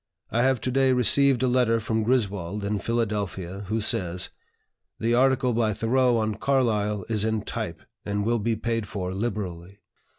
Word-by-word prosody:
I 120 - +2
have 130 0 +2
to 130 - -1
day 135 0 +3
received 130 +2 +3
a - - +3
letter 125 -2 +2
from 110 0 -1
Griswold, 105 -5 -1
in 100 +1 -1
Philadelphia, 100 -4 -2
who 110 +3 -1
says: 90 -4 0 0.7
'The 115 +1 0
article 130 0 +3
by 110 -2 +1
Thoreau 120 +3 +2
on 110 -1 0
Carlyle 105 -5 0
is 110 -2 +1
in 110 -1 0
type, - - -5 0.2
and 100 0 -2
will 120 +1 +1
be 115 +2 0
paid 115 0 -2
for 95 -2 -4
liberally.' 95 -3 -4
110 Hz, 165 wpm, -25 LUFS, 100-120 Hz, 0.7 s, day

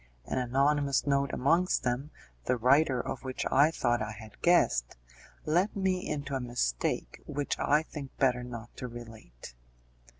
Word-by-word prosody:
An 130 - -2
anonymous 140 +2 +2
note 140 -1 +1
amongst 165 +7 +2
them, 125 +4 -1 0.4
the 125 - +1
writer 130 +2 +4
of 125 - -4
which 130 -1 -4
I 145 +3 +6
thought 120 -7 0
I 105 0 -3
had 110 0 -13
guessed, 115 - +3 0.5
let 175 +7 +1
me 190 -2 0
into 145 -2 -3
a 135 - 0
mistake 120 - -2
which 145 0 -2
I 150 +2 +3
think 145 -4 -9
better 125 -2 +2
not 120 -1 -8
to 125 - -5
relate. 110 - -11
130 Hz, 155 wpm, -30 LUFS, 120-145 Hz, 0.5 s, I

